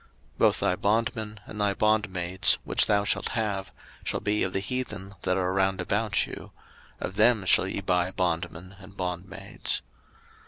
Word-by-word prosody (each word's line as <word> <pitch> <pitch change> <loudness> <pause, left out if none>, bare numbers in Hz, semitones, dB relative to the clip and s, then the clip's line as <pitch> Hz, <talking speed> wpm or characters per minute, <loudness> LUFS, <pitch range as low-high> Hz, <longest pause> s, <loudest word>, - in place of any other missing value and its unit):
03:025:044 - - -32
Both - - +4
thy 90 - +2
bondmen, 110 +1 -1
and 105 -1 -6
thy 100 -1 +2
bondmaids, 95 -4 +3
which - - +3
thou 100 -1 +3
shalt 100 - 0
have, 100 -3 -1 0.3
shall - - -1
be 105 +1 0
of 95 - +1
the 95 - -1
heathen 100 -2 -4
that 90 0 0
are 95 0 0
round 95 0 +1
about 105 +2 +1
you; - - -9 0.5
of 95 - -5
them 110 -2 +4
shall 95 - +5
ye 100 - -3
buy 90 -2 +1
bondmen 90 +1 -3
and 100 0 -14
bondmaids. 90 0 -3
95 Hz, 165 wpm, -27 LUFS, 90-105 Hz, 0.5 s, shall